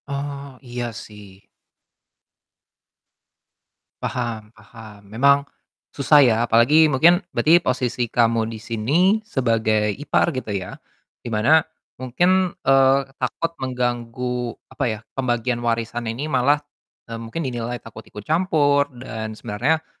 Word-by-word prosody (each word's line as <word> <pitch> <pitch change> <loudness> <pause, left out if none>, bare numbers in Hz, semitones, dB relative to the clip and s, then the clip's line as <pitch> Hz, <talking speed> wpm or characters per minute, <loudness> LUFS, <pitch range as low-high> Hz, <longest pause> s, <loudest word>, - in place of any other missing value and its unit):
Oh 140 -1 -6
iya 120 -2 -5
sih. 105 -3 -12 2.6
Paham 115 -3 -4
paham 110 -3 -14
memang, 140 +5 +5 0.6
susah 145 0 +5
ya 115 -3 +4
apalagi 150 +8 +5
mungkin 170 +7 +4 0.2
berarti 170 +3 +5
posisi 125 -3 -1
kamu 115 -1 +1
di 115 - -7
sini 140 - +1
sebagai 110 - 0
ipar 145 +6 0
gitu 130 -4 -5
ya, 95 -3 -4 0.5
di - - -7
mana 115 +9 +4 0.4
mungkin, 180 +9 +2 0.2
eee, 135 0 +5 0.2
takut 165 +6 -2
mengganggu 125 -1 -3 0.2
apa - - -3
ya, 110 -1 -4
pembagian 120 -2 -1
warisan 115 0 -2
ini 120 +6 -4
malah, 145 -1 +2 0.6
eee, 115 - -6
mungkin 115 +8 -5
dinilai 120 -1 -3
takut 110 -1 -12
ikut 105 - -10
campur 150 -4 +2
dan 110 -4 -7
sebenarnya, 130 +10 -1
125 Hz, 115 wpm, -22 LUFS, 115-140 Hz, 2.6 s, memang